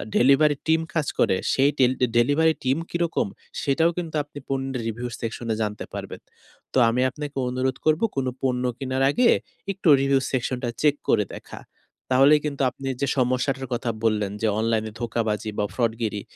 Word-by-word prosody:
Delivery 140 Hz, +3 st, +5 dB
team 160 Hz, 0 st, +3 dB
কাজ 155 Hz, -4 st, 0 dB
করে। -, -, +3 dB, 0.2 s
সেই 135 Hz, +1 st, +4 dB
টিল্ব 130 Hz, -1 st, +3 dB, 0.2 s
ডেলিভারি 145 Hz, +7 st, +4 dB
টিম 130 Hz, +2 st, +1 dB
কি -, -, -2 dB
রকম? 170 Hz, -, -1 dB, 0.3 s
সেটাও 160 Hz, +5 st, +2 dB
কিন্তু 165 Hz, -3 st, -4 dB
আপনি 145 Hz, 0 st, -11 dB
পণ্যের 135 Hz, -2 st, -2 dB
রিভিউ 115 Hz, +2 st, -3 dB
সেকশনে 115 Hz, 0 st, -3 dB
জানতে 105 Hz, -1 st, -3 dB
পারবেন। -, -, -7 dB, 0.5 s
তো -, -, 0 dB
আমি 120 Hz, +2 st, 0 dB
আপনাকে 145 Hz, +1 st, -7 dB
অনুরোধ 130 Hz, +1 st, -1 dB
করব 155 Hz, 0 st, +3 dB
কোন 135 Hz, -1 st, -1 dB, 0.2 s
পণ্য 125 Hz, -1 st, 0 dB
কেনার 130 Hz, 0 st, -1 dB
আগে 240 Hz, +10 st, +3 dB, 0.4 s
একটু 195 Hz, -2 st, -4 dB
রিভিউ 135 Hz, 0 st, +3 dB
সেকশনটা 125 Hz, -1 st, -1 dB
চেক 150 Hz, -1 st, +4 dB
করে -, -, +4 dB
দেখা। -, -, -10 dB, 0.5 s
তাহলেই 135 Hz, +4 st, +6 dB
কিন্তু 145 Hz, -2 st, -3 dB
আপনি 135 Hz, -, -8 dB
যে, 140 Hz, -, +1 dB
সমস্যাটার 130 Hz, +1 st, 0 dB
কথা 120 Hz, 0 st, -2 dB
বললেন 105 Hz, -3 st, +1 dB
যে, 110 Hz, -, +2 dB
অনলাইনে 110 Hz, -1 st, 0 dB
ধোঁকাবাজি 110 Hz, -2 st, -1 dB
বা 105 Hz, -, +2 dB
ফ্রডগিরি, 110 Hz, -3 st, -1 dB
130 Hz, 165 wpm, -24 LUFS, 115-145 Hz, 0.5 s, তাহলেই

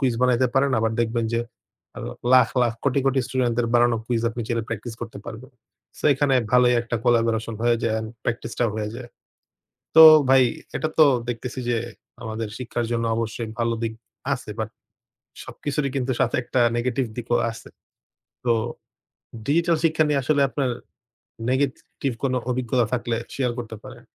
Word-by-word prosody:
Quiz 130 Hz, -4 st, +1 dB
বানাইতে 125 Hz, 0 st, +3 dB
পারেন। 135 Hz, +1 st, +3 dB
আবার 110 Hz, 0 st, +1 dB
দেখবেন 115 Hz, 0 st, 0 dB
যে 115 Hz, -, +2 dB, 0.6 s
অ -, -, -6 dB, 0.3 s
লাখ, 125 Hz, -3 st, +7 dB
লাখ, 120 Hz, -, +2 dB
কোটি, 140 Hz, 0 st, +2 dB
কোটি, 135 Hz, 0 st, +3 dB
স্টুডেন্টদের 120 Hz, -2 st, 0 dB
বানানো 120 Hz, -1 st, +4 dB
কুইজ 120 Hz, -2 st, 0 dB
আপনি 120 Hz, +1 st, -6 dB
চাইলে 115 Hz, -1 st, -1 dB
প্র্যাকটিস 115 Hz, +1 st, -5 dB
করতে 115 Hz, -3 st, -7 dB
পারবেন। 120 Hz, +5 st, -9 dB, 0.5 s
সো -, -, -13 dB
এখানে 135 Hz, -1 st, +2 dB, 0.2 s
ভালোই 125 Hz, 0 st, +5 dB
একটা 120 Hz, 0 st, -3 dB
কোলাবরেশন 115 Hz, -1 st, +1 dB
হয়ে 120 Hz, 0 st, +3 dB
যায় 115 Hz, -, +1 dB
অ্যান্ড 110 Hz, 0 st, -3 dB
প্র্যাকটিসটাও 120 Hz, -1 st, -2 dB
হয়ে 105 Hz, -1 st, -3 dB
যায়। 120 Hz, 0 st, -8 dB, 0.9 s
তো 160 Hz, -, +11 dB, 0.3 s
ভাই 135 Hz, -1 st, +6 dB, 0.3 s
এটা 155 Hz, -, -1 dB
তো 155 Hz, -, +9 dB, 0.2 s
দেখতেছি 120 Hz, +2 st, -4 dB
যে 120 Hz, -, +2 dB, 0.5 s
আমাদের 110 Hz, -1 st, -4 dB
শিক্ষার 120 Hz, -1 st, -3 dB
জন্য 115 Hz, 0 st, 0 dB
অবশ্যই 115 Hz, 0 st, -3 dB
ভালো 115 Hz, 0 st, +1 dB
দিক 115 Hz, -1 st, -1 dB, 0.4 s
আছে। 125 Hz, -, -8 dB
বাট 110 Hz, -1 st, -2 dB, 0.8 s
সবকিছুরই 145 Hz, -1 st, -3 dB
কিন্তু 130 Hz, 0 st, -1 dB
সাথে 125 Hz, -3 st, +2 dB
একটা 125 Hz, 0 st, 0 dB, 0.2 s
নেগেটিভ 125 Hz, +1 st, 0 dB
দিকও 120 Hz, 0 st, 0 dB
আছে। 115 Hz, -, -12 dB, 0.8 s
তো 120 Hz, -, +4 dB, 0.9 s
ডিজিটাল 170 Hz, +3 st, +2 dB
শিক্ষা 155 Hz, -1 st, +3 dB
নিয়ে 140 Hz, -2 st, +2 dB
আসলে 145 Hz, +2 st, +1 dB
আপনার 135 Hz, -2 st, -1 dB, 0.8 s
নেগেটিভ 135 Hz, 0 st, -1 dB
কোনো 130 Hz, -1 st, +1 dB
অভিজ্ঞতা 125 Hz, -1 st, +1 dB
থাকলে 120 Hz, -1 st, -1 dB, 0.2 s
শেয়ার 125 Hz, -3 st, 0 dB
করতে 110 Hz, -2 st, -6 dB
পারেন। 130 Hz, -2 st, -11 dB
120 Hz, 160 wpm, -23 LUFS, 115-130 Hz, 0.9 s, তো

